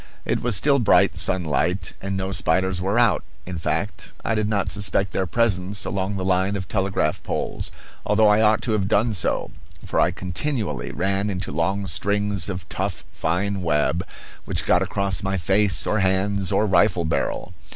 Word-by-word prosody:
It -, -, 0 dB
was 120 Hz, -3 st, +1 dB
still 140 Hz, +7 st, +4 dB
bright 115 Hz, -, +4 dB
sunlight 90 Hz, +2 st, -1 dB
and 95 Hz, 0 st, -3 dB
no 95 Hz, 0 st, -2 dB
spiders 95 Hz, +1 st, +1 dB
were 100 Hz, +4 st, 0 dB
out; 120 Hz, -2 st, +3 dB, 0.2 s
in 90 Hz, -2 st, -5 dB
fact, -, -, -3 dB
I -, -, +1 dB
did 110 Hz, -1 st, 0 dB
not 100 Hz, -2 st, 0 dB
suspect 100 Hz, -2 st, 0 dB
their 95 Hz, -, -1 dB
presence 100 Hz, -1 st, 0 dB
along 100 Hz, +1 st, -2 dB
the 95 Hz, -1 st, -3 dB
line 95 Hz, +2 st, +1 dB
of 95 Hz, -2 st, -4 dB
telegraph 95 Hz, -6 st, 0 dB
poles, -, -, -3 dB, 0.3 s
although 105 Hz, +1 st, +4 dB
I 105 Hz, +1 st, +5 dB
ought 110 Hz, 0 st, +3 dB
to 115 Hz, -, 0 dB
have 100 Hz, -3 st, +1 dB
done 110 Hz, +3 st, +2 dB
so, 95 Hz, -, -1 dB, 0.3 s
for -, -, -1 dB
I -, -, +4 dB
continually 90 Hz, -, -2 dB
ran 100 Hz, +2 st, 0 dB
into 95 Hz, -1 st, -3 dB
long 95 Hz, +6 st, 0 dB
strings 100 Hz, +2 st, 0 dB
of 90 Hz, -3 st, -5 dB
tough 95 Hz, +1 st, -3 dB
fine 95 Hz, +4 st, -1 dB
web, 80 Hz, 0 st, +1 dB, 0.4 s
which -, -, -1 dB
got -, -, +3 dB
across 100 Hz, -1 st, 0 dB
my 95 Hz, 0 st, -1 dB
face 95 Hz, +3 st, +1 dB
or 110 Hz, -, +1 dB
hands 95 Hz, 0 st, +1 dB
or 100 Hz, +2 st, +3 dB
rifle 95 Hz, -2 st, +3 dB
barrel. 80 Hz, +3 st, -2 dB
95 Hz, 175 wpm, -23 LUFS, 90-105 Hz, 0.4 s, I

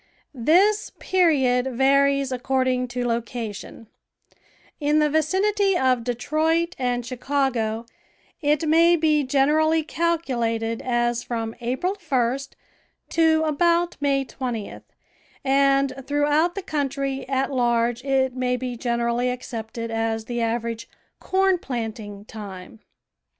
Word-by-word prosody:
This 365 Hz, -, +3 dB
period 270 Hz, -9 st, +2 dB
varies 275 Hz, +1 st, +3 dB
ac 250 Hz, -, -4 dB
cording 255 Hz, -1 st, +1 dB
to 245 Hz, 0 st, -3 dB
location; 230 Hz, -2 st, -4 dB, 0.9 s
in 295 Hz, 0 st, +2 dB
the 300 Hz, -1 st, +3 dB
vicinity 385 Hz, +5 st, +2 dB
of 255 Hz, -4 st, +2 dB
Detroit 315 Hz, +8 st, 0 dB
and 245 Hz, -2 st, -1 dB
Chicago 245 Hz, -3 st, -1 dB, 0.6 s
it 300 Hz, +1 st, +1 dB
may 335 Hz, +2 st, +5 dB
be 310 Hz, -2 st, +2 dB
generally 300 Hz, +4 st, +2 dB
calculated 240 Hz, -10 st, -1 dB
as 240 Hz, -1 st, 0 dB
from 225 Hz, -2 st, -4 dB
April 260 Hz, +11 st, -1 dB
1st 270 Hz, -, -1 dB, 0.6 s
to 320 Hz, -1 st, +3 dB
about 340 Hz, +3 st, +1 dB
May 275 Hz, -1 st, +1 dB
20th, 245 Hz, -6 st, -5 dB, 0.6 s
and 275 Hz, 0 st, +3 dB
throughout 295 Hz, +4 st, +2 dB
the 395 Hz, -, -4 dB
country 275 Hz, -4 st, -2 dB
at 270 Hz, +1 st, 0 dB
large 240 Hz, -1 st, +1 dB
it 265 Hz, -2 st, +1 dB
may 250 Hz, -1 st, 0 dB
be 250 Hz, 0 st, -4 dB
generally 235 Hz, +1 st, 0 dB
accepted 230 Hz, -2 st, -5 dB
as 225 Hz, 0 st, -1 dB
the 240 Hz, 0 st, -3 dB
average 230 Hz, 0 st, -2 dB, 0.2 s
" -, -, -46 dB
corn 380 Hz, -1 st, +3 dB
planting 220 Hz, -6 st, -5 dB
time." 190 Hz, -, -9 dB
265 Hz, 115 wpm, -23 LUFS, 235-310 Hz, 0.9 s, may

